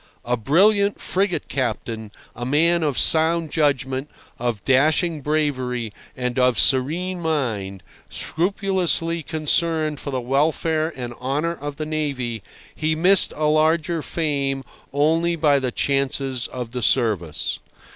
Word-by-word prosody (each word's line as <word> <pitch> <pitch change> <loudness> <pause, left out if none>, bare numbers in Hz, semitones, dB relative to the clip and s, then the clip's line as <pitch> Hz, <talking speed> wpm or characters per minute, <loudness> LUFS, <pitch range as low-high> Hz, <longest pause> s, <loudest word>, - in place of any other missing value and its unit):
A 125 - +1
brilliant 200 - +3
frigate 190 -1 -1
captain, 115 -3 -3 0.3
a 120 - -6
man 165 +6 +2
of 145 -5 -1
sound 160 0 +3
judgment, 135 -2 0 0.3
of 120 -4 -3
dashing 155 +4 +2
bravery 130 -6 -1 0.2
and 125 0 -2
of 125 -2 +3
serene 165 +8 +2
mind, 115 - -2 0.3
scrupulously 175 -2 -1
concerned 155 -1 0
for - - -6
the 130 -2 -2
welfare 155 +5 0
and 120 -2 -6
honour 145 +6 -1
of 145 -3 -7
the 155 - -4
navy, 140 -7 -3 0.3
he 155 0 -1
missed 185 +4 +5
a 155 - -1
larger 160 +2 +2
fame 140 -4 -2 0.3
only 165 +4 +2
by 150 -3 +3
the 130 -2 -2
chances 135 -1 0
of 125 -2 -6
the 125 0 -4
service. 105 - 0
145 Hz, 125 wpm, -22 LUFS, 125-160 Hz, 0.3 s, missed